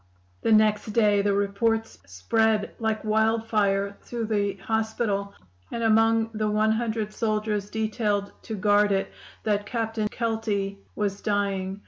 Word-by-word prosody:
"The - - +1
next 215 0 +3
day 210 -3 +4
the 200 0 +1
report 220 +3 +1 0.2
spread 210 - +1
like 220 -1 -1
wildfire 215 -2 +1
through 235 -2 -4
the 205 -2 0
hospital, 215 -1 -2 0.4
and 230 - -3
among 225 0 +3
the 215 0 -1
one 215 +1 +2
hundred 220 -2 -1
soldiers 215 -2 -1
detailed 210 -2 -1
to 220 - -4
guard 205 0 +3
it, 195 0 0 0.3
that 205 -1 0
Captain 225 -2 -1
Kelty 215 -3 -2 0.2
was 200 -1 -2
dying. 200 -2 -1
215 Hz, 130 wpm, -26 LUFS, 200-225 Hz, 0.4 s, day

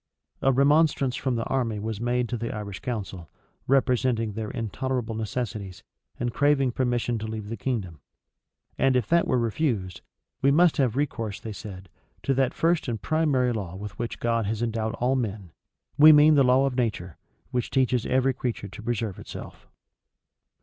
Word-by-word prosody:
A 135 - +4
remonstrance 140 -1 +3
from 130 -2 -1
the 115 - -1
army 120 -5 -1
was 110 +1 -4
made 120 0 0
to 125 - -2
the 115 0 -3
Irish 105 -2 -6
council, 95 -8 -5 0.4
representing 125 -4 +2
their 110 0 -4
intolerable 120 +1 -3
necessities, 110 -4 -4 0.4
and 120 -1 -2
craving 145 -2 +2
permission 120 -2 -1
to 110 - -5
leave 110 -1 -6
the 115 - -3
kingdom: 100 - -3 0.8
and 135 -1 +3
if 125 -4 +2
that 170 0 +3
were - - +2
refused, 115 - -1 0.4
"We 135 - +4
must 165 +3 +4
have 125 -5 +1
recourse," 115 -7 -2
they 110 - -7
said, 95 -2 -9 0.4
"to 135 - +1
that 130 -1 +1
first 165 -1 +1
and 115 -3 -2
primary 135 -1 +1
law 95 -5 -5
with 105 +1 -8
which 120 0 -4
God 115 -2 0
has 110 +2 -2
endowed 110 -1 -2
all 125 +2 +1
men; 105 -8 -3 0.5
we 155 +2 +10
mean 150 +1 +7
the 145 - +5
law 130 +2 +4
of 135 - -1
nature, 100 - -2 0.3
which 125 -1 -1
teaches 130 -3 +1
every 130 +1 +2
creature 120 -5 -4
to 100 - -10
preserve 115 -3 -3
itself." - - -10
120 Hz, 170 wpm, -26 LUFS, 110-130 Hz, 0.8 s, we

